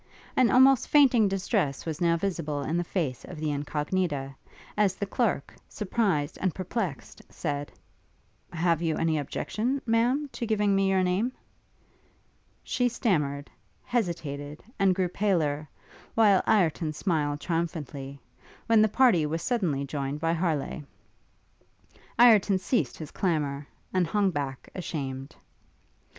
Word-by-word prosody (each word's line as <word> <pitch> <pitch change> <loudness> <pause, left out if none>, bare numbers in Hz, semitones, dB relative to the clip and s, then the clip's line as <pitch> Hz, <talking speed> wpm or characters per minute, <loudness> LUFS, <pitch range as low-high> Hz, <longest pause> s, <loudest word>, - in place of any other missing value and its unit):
An 255 -3 +4
almost 260 0 +5
fainting 260 -7 +5
distress 190 - -1
was 160 -1 -4
now 170 -1 +3
visible 165 -6 -2
in 155 - -2
the 175 - +1
face 160 -8 -3
of 180 - -9
the 155 -1 -2
Incognita, 145 0 -2 0.4
as 200 -3 +2
the 200 - -3
clerk, 200 - -1 0.2
surprised 185 -8 -1
and 185 -3 0
perplexed, 185 - -4
said, 145 -3 -4 0.8
'Have 170 -1 +1
you 160 -2 0
any 160 -1 +1
objection, 235 - -2
Ma'am, 245 +6 +2
to 235 - -4
giving 210 -2 +2
me 195 0 +2
your 190 -1 +2
name?' 195 +8 0 1.3
She 245 -1 0
stammered, 150 - -1 0.3
hesitated, 160 - -3 0.2
and 195 -2 +4
grew 185 -1 +1
paler, 160 -7 0 0.5
while 205 -4 +5
Ireton 165 -6 +2
smiled 150 -4 -1
triumphantly, 150 -5 -4 0.5
when 225 -1 +5
the 215 - +5
party 205 -10 +4
was 165 +2 -3
suddenly 170 - 0
joined 140 +1 -3
by 165 +1 +1
Harleigh. 160 -3 -1 1.4
Ireton 215 -5 +6
ceased 200 +7 -1
his 155 -3 -8
clamour, 150 -6 -1 0.3
and 185 -2 +2
hung 200 +1 +1
back, 140 -4 -4
ashamed. 135 -7 -5
175 Hz, 130 wpm, -27 LUFS, 150-205 Hz, 1.4 s, Ireton